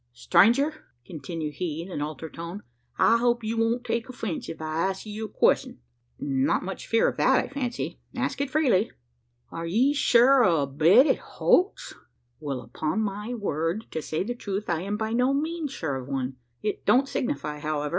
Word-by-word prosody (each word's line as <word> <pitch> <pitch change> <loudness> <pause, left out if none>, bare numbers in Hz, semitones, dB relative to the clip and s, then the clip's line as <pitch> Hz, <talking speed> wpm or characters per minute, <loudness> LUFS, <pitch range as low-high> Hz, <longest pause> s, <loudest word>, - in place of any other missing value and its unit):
"Stranger!" 245 - +3 0.2
continued 155 +1 -5
he 165 -2 -3
in 185 - -10
an 145 - -4
altered 155 +1 -5
tone, 170 +5 -7 0.3
"I 230 - +5
hope 240 -1 +1
you 220 +1 -2
won't 230 +2 +1
take 230 +2 -2
offence 220 -9 -5
if 160 - -7
I 160 +3 -1
ask 190 +2 -5
you 215 +1 -5
a - - -8
question?" - - +2 0.4
"Not 135 -1 0
much 190 +1 -6
fear 225 - +3
of - - -2
that, - - +4
I - - 0
fancy. 255 -3 -4 0.2
Ask - - -2
it 280 - -1
freely." 260 -8 +2 0.6
"Are 165 0 -5
ye 245 +11 +3
sure 260 -1 +5
o' 165 -8 +3
a - - 0
bed 160 - +5
at - - +2
Holt's?" 370 +4 +1 0.5
"Well, 140 -4 -4
upon 155 - -2
my 210 +4 -3
word, 190 0 -2
to 160 - -3
say 155 +3 -2
the 240 +5 -3
truth, 205 -4 -4
I 165 -1 0
am 200 +3 -3
by 220 +1 -2
no 250 +3 +2
means 315 0 -2
sure 155 - -3
of 130 -1 -7
one. 135 -1 -3 0.3
It 210 - -2
don't 265 +2 +4
signify, 150 - -3
however. 150 -1 -2
200 Hz, 190 wpm, -26 LUFS, 155-240 Hz, 0.6 s, I